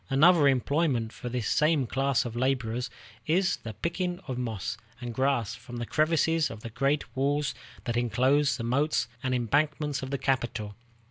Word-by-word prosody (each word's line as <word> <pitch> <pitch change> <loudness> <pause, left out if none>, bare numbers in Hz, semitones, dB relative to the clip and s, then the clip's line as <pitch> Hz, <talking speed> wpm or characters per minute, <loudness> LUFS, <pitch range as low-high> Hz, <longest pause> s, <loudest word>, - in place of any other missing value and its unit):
Another 150 +2 +6
employment 135 -3 +1
for 125 - -6
this 120 -3 -2
same 150 -3 +3
class 135 +2 +1
of 120 -1 -5
laborers 125 -1 0 0.4
is 180 +4 +2
the 110 -2 -8
picking 175 - -2
of 130 - -3
moss 115 -5 -3 0.2
and 120 -2 -5
grass 130 -4 +1
from 120 0 -9
the 120 - -3
crevices 160 +2 +2
of 110 -1 -8
the 115 - -7
great 135 +4 0
walls 140 +2 +1 0.3
that 120 - -2
inclose 130 +5 +2
the 115 - -4
moats 140 +6 +1
and 130 0 0
embankments 145 +4 0
of 130 - -5
the 140 - -1
capital. 120 -6 -1
135 Hz, 170 wpm, -28 LUFS, 120-150 Hz, 0.4 s, Another